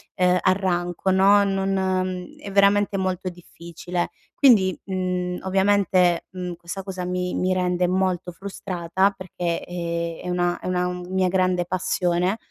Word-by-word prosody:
uhm, 180 0 +3
arranco 185 -1 0
no, 200 +2 +5
non 190 -2 -1
è 200 - -8
veramente 200 0 +3
molto 185 -1 -2
difficile. 175 0 -5 0.2
Quindi, 205 -9 +4
mhmm, 180 -1 -2
ovviamente, 190 -2 +2
mhmm, 180 -1 -5
questa 175 +3 -7
cosa 185 -2 -5
mi 180 0 -2
mi 185 0 +1
rende 180 -1 +1
molto 185 -1 0
frustrata 190 0 -1
perché, 180 -3 -4
ehm, 170 -1 -4
è 180 - -5
una 175 0 0
è - - -7
una 180 -1 0 0.3
mia 190 0 +1
grande 185 -1 +1
passione 180 +1 0
185 Hz, 135 wpm, -23 LUFS, 175-190 Hz, 0.3 s, no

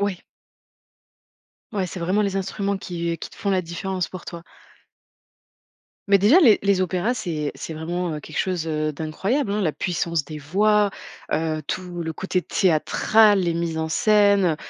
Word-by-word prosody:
Oui. 200 -3 -1 1.5
Oui, 195 -3 -1
c'est 180 - -7
vraiment 185 +5 +1
les 200 -1 -1
instruments 195 +1 -2
qui 170 -2 -3
qui - - -8
te - - -16
font 200 - -2
la 185 -1 +1
différence 175 +1 -3
pour 185 -2 -9
toi. 170 -1 -8 1.7
Mais 200 0 +6
déjà 240 - +6
les 230 - +6
les 200 -2 +2
opéras, 185 +6 0
c'est 165 -10 -3
c'est 160 - -7
vraiment 165 0 -3
quelque 155 - -7
chose, 180 -4 -1
heu, 155 -1 -1
d'incroyable, 195 - -2
hein. 210 - 0
La 160 -6 +1
puissance 170 -3 -1
des 155 0 -8
voix, 205 +7 +2 0.4
heu, 155 0 -1
tout 180 -2 -4
le 160 0 -3
côté 185 +1 -2
théâtral, 195 +6 +3
les 170 -2 0
mises 170 -1 -2
en 160 0 -2
scène, 200 -2 +3
180 Hz, 165 wpm, -23 LUFS, 160-200 Hz, 1.7 s, Mais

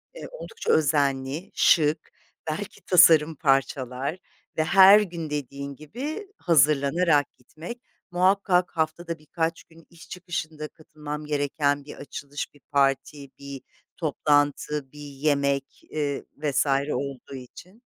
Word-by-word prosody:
eee, - - -8
oldukça 470 -2 -4
özenli, 140 0 0
şık, 155 -1 +3 0.4
belki 205 +6 -5
tasarım 160 -3 +6
parçalar 135 +1 0 0.4
ve 155 - +3
her 195 +4 +8
gün 170 -5 -5
dediğin 140 -1 -5
gibi 280 - -6
hazırlanarak 150 0 +3
gitmek 165 - -10 0.3
muhakkak 185 0 +2
haftada 160 +1 -2
birkaç 165 +2 -3
gün 165 -1 -20
iş 170 -1 -16
çıkışında 160 -4 -5
katılmam 150 -2 -8
gereken 145 -1 0
bir - - -9
açılış, 145 +1 -7
bir 145 - -22
parti, 140 0 0
bir 140 -1 -8 0.4
toplantı, 145 -2 0
bir 150 - -14
yemek, 140 -1 -1
ııı, 145 -2 -2
vs. 150 -1 +1 0.3
olduğu 140 -1 -5
için. 180 - -13
150 Hz, 115 wpm, -25 LUFS, 140-170 Hz, 0.4 s, her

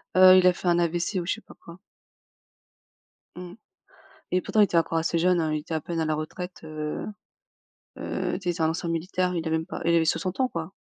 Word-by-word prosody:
Heu, 185 0 +9
il 185 0 +5
a 180 - +5
fait 180 - -6
un 170 - +3
AVC 175 +3 0
ou 175 - -4
je 185 - 0
sais 225 - -13
pas - - -16
quoi. 170 +1 -14 1.6
Mmh 180 0 -9 0.8
et 185 - +2
pourtant, 215 - +2
il - - +9
était 185 -4 +1
encore 165 0 +1
assez 165 +1 0
jeune 180 +1 +3
hein, 155 -2 0
il 155 - 0
était 160 +2 -5
à 155 - -1
peine 170 -1 -4
à 160 - 0
la 155 - 0
retraite. 180 +4 -6
Heu 155 -1 -5 0.9
heu, - - -3
tu 180 -3 -3
sais? - - +1
C'est 165 - -5
un 160 - +3
ancien 170 +1 -3
militaire, 180 +2 -1
il 165 -1 -2
avait 160 0 +1
même 160 - -4
pas - - -7
il 170 0 +3
avait 165 -1 +3
60 185 +5 -1
ans, 260 - +3
quoi. 170 -4 -6
170 Hz, 245 wpm, -26 LUFS, 160-180 Hz, 1.6 s, Heu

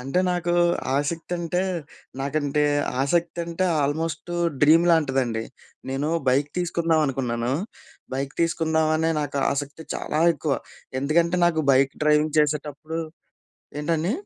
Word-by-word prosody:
అంటే 135 +8 0
నాకు 175 -1 -1 0.4
ఆసక్తంటే, 170 +3 -1 0.6
నాకంటే 145 +1 0 0.4
ఆసక్తంటే, 170 +3 -1 0.2
ఆల్మోస్టు 165 +4 -2 0.3
డ్రీమ్ 160 +3 +6
లాంటిదండి. 135 -8 +1 0.5
నేను 135 +3 -1 0.2
బైక్ 140 +3 +2
తీసుకుందామనుకున్నాను. 145 -9 0 0.6
బైక్ 135 +1 -3
తీసుకుందాం 160 -1 +1
అనే 160 +1 +1
నాకు 145 -1 -3
ఆసక్తి 145 +3 -5
చాలా 155 - -2
ఎక్కువ. 145 -1 -1 0.4
ఎందుకంటే, 170 +5 +2
నాకు 160 -2 +1
బైక్ 135 +1 +3
డ్రైవింగ్ 150 0 +3
చేసేటప్పుడు 150 +1 -2 0.8
ఏంటండి? 165 +5 0
155 Hz, 100 wpm, -24 LUFS, 140-165 Hz, 0.8 s, డ్రీమ్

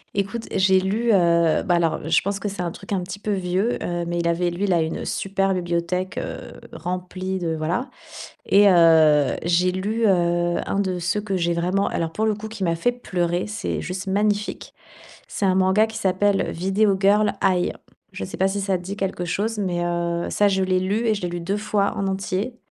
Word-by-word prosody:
Écoute, 200 +4 -2
j'ai 190 0 +4
lu, 220 +5 0
heu, 170 -3 +3
bah, 180 -4 +2
alors, 165 -2 0
je 165 - +4
pense 200 +1 -2
que 205 - -3
c'est 195 -2 -5
un 170 - -2
truc 195 +3 -7
un 185 - 0
petit 190 +2 -7
peu 210 - -3
vieux, 190 +5 0
heu, 175 -1 -2
mais 175 0 -2
il 170 - 0
avait 175 +1 +1
lu 180 +4 -2
là, 175 -4 +2
une 160 - -3
super 195 0 -1
bibliothèque, 180 +1 -2
heu, - - -6
remplie 185 +1 -4
de 165 -2 -2
voilà. 170 - -2 0.6
Et 205 +1 +5
heu, 160 -5 +5
j'ai 175 +2 +2
lu, 215 +5 -1
heu, 175 -2 +2
un 200 - -1
de 185 -2 -1
ceux 185 +5 -1
que 200 -2 -3
j'ai 170 -1 0
vraiment, 180 +4 0
alors 165 -1 -2
pour 220 - 0
le 215 -1 +1
coup, 215 +1 -7
qui 215 -3 -6
m'a 170 -1 +1
fait 245 +9 +1
pleurer. 180 -6 -2
C'est 210 +1 -3
juste 185 +1 -5
magnifique. 205 +1 -1 0.5
C'est 200 - -2
un 185 -1 +3
manga 190 +4 +3
qui 220 0 -7
s'appelle: 195 0 +1
«Video 195 +3 +1
Girl 205 +2 +3
Ai». 185 -2 +2 0.4
Je 95 - -5
sais - - -8
pas 190 - +3
si 200 +1 -2
ça 190 -1 0
dit 185 +3 -6
quelque 190 -3 -2
chose? 215 +5 -2
Mais 175 -3 -1
heu, 170 0 -1
ça, 205 - +3
je 190 -1 +1
l'ai 185 0 +1
lu 205 +5 -1
et 220 - +3
je 200 - -6
l'ai 175 - -2
lu 175 0 -4
2 195 +4 -2
fois 205 -1 0
en 195 - -1
entier. 195 +5 -3
190 Hz, 215 wpm, -23 LUFS, 175-200 Hz, 0.6 s, Et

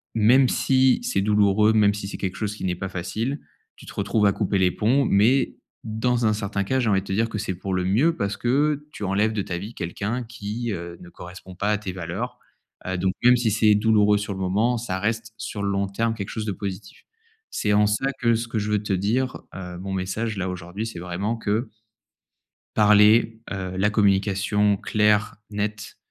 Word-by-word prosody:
même 120 +4 +5
si 130 -1 +3
c'est 100 - 0
douloureux, 105 +1 +3
même 105 -2 +4
si 100 -1 -5
c'est - - -6
quelque 95 -1 -4
chose 105 -1 -3
qui 105 - -6
n'est 90 - 0
pas 95 +2 -5
facile, 110 - -3 0.4
tu - - -14
te - - -9
retrouves 105 +2 +1
à - - +4
couper 100 -1 0
les 90 -1 +3
ponts 120 +10 +2
mais 120 +7 +3 0.3
dans 120 +2 0
un - - +3
certain 100 -2 -2
cas, 130 +6 0
j'ai 120 -4 +1
envie 95 -2 +2
de 95 - -14
te - - -5
dire 115 +3 +1
que 110 - -4
c'est 95 -2 -3
pour 95 +2 -4
le 90 - 0
mieux, 130 - +2
parce 100 +1 -2
que 145 +4 +1
tu - - -7
enlèves 105 +3 +1
de 105 - -1
ta 90 -2 -4
vie 100 +6 -7
quelqu'un 105 +8 -3
qui, 115 0 -5
heu, 85 -1 -7
ne 90 - -12
correspond 90 +1 -11
pas 100 +3 -1
à 105 - +2
tes 100 -3 -5
valeurs. 95 +7 -5 0.5
Heu, 95 0 -1
donc 95 +1 0
même 125 +1 +6
si 120 -2 +1
c'est 105 0 +4
douloureux 105 -1 +4
sur 105 -1 -4
le 95 - -7
moment, 105 +6 +1
ça 105 -5 -3
reste 110 +2 -2
sur 110 -1 -5
le 100 - 0
long 100 0 0
terme 115 +4 -1
quelque 100 -3 -5
chose 110 -2 -4
de 105 - -1
positif. 100 0 -7 0.5
C'est 105 - -1
en 105 0 +4
ça 105 +6 0
que 115 -1 +3
ce 115 +1 -3
que 110 - -1
je 105 +1 -2
veux 105 0 +1
te 105 - -4
dire, 115 +8 0 0.2
heu, 90 -2 -7
mon 95 +1 -5
message 95 +4 -2
là, 95 0 -2
aujourd'hui 90 +4 -5
c'est 110 - -7
vraiment 95 +6 -3
que 110 +3 -1 1.1
parler, 105 +2 +5
heu, 95 -2 -4
la 105 +2 +2
communication 100 0 +2
claire, 105 0 +1 0.2
nette, 105 0 -4
105 Hz, 215 wpm, -24 LUFS, 95-115 Hz, 1.1 s, même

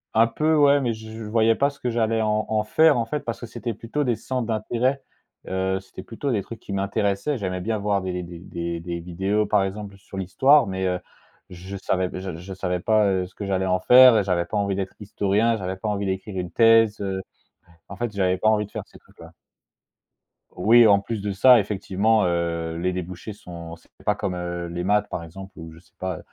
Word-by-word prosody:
Un 115 +1 +6
peu, 155 +7 +1
ouais, 145 -1 +5
mais 120 -3 0
je 110 +1 -9
voyais 115 +1 +3
pas 140 +4 +1
ce 140 - -15
que 125 - -2
j'allais 115 -1 +1
en 110 0 +1
en 110 -1 +1
faire, 155 +5 +4
en 115 - 0
fait, 150 +6 -3
parce 115 -3 -5
que 120 - -7
c'était 115 -1 -5
plutôt 120 +7 -3
des 120 -3 +1
centres 125 -1 -3
d'intérêt, 120 +5 -1 0.4
heu, 95 0 -1
c'était 95 0 -11
plutôt 125 +7 -4
des 105 -4 0
trucs 110 +3 -10
qui 100 - -8
m'intéressaient, 100 +6 -1
j'aimais 90 -3 -3
bien 110 +2 -1
voir 100 -1 0
des 90 -1 -3
des 85 -1 -9
des 85 -1 -5
des 85 0 -5
vidéos, 95 +5 -1
par 100 -1 +2
exemple, 100 0 -5
sur 95 0 -11
l'Histoire 135 +9 +4
mais 95 -1 -2
heu, 90 -1 -1 0.5
je 95 +3 -8
savais 95 -1 -1 0.3
je 95 +3 -8
savais 90 -1 -2
pas, 110 +2 +3
heu, 95 -2 0
ce 90 - -22
que 100 - -5
j'allais 95 -1 0
en 90 0 +1
faire 125 +2 +8
et 105 - +2
j'avais 90 -2 0
pas 105 - -3
envie 100 -1 0
d'être 95 -1 -4
historien, 105 +2 +1
j'avais 95 -1 -4
pas 105 +2 -3
envie 100 -1 -2
d'écrire 95 +1 -4
une 90 -1 -3
thèse, 115 -1 +5
heu, 95 -1 -2 0.7
en 100 - -9
fait, 120 0 -3
j'avais 95 -2 +1
pas 110 +3 +2
envie 105 -1 +2
de - - -18
faire - - -5
ces - - -17
trucs-là. - - -16 1.2
Oui, 115 +4 +6
en 100 -1 +5
plus 105 +1 -5
de 100 0 -2
ça, 120 +5 +6
effectivement, 105 +1 +1
heu, 85 -1 -1
les 90 +1 0
débouchés 90 +3 -6
sont 85 -4 -9
c'est 85 - -24
pas - - +1
comme, 95 - -3
heu, 85 -1 -4
les 85 +1 -4
maths 105 +2 +2
par 85 - -4
exemple, 95 +4 -10
ou 80 0 -9
je 80 - -15
sais 80 -3 -27
pas, 95 -2 -3
100 Hz, 225 wpm, -24 LUFS, 90-115 Hz, 1.2 s, faire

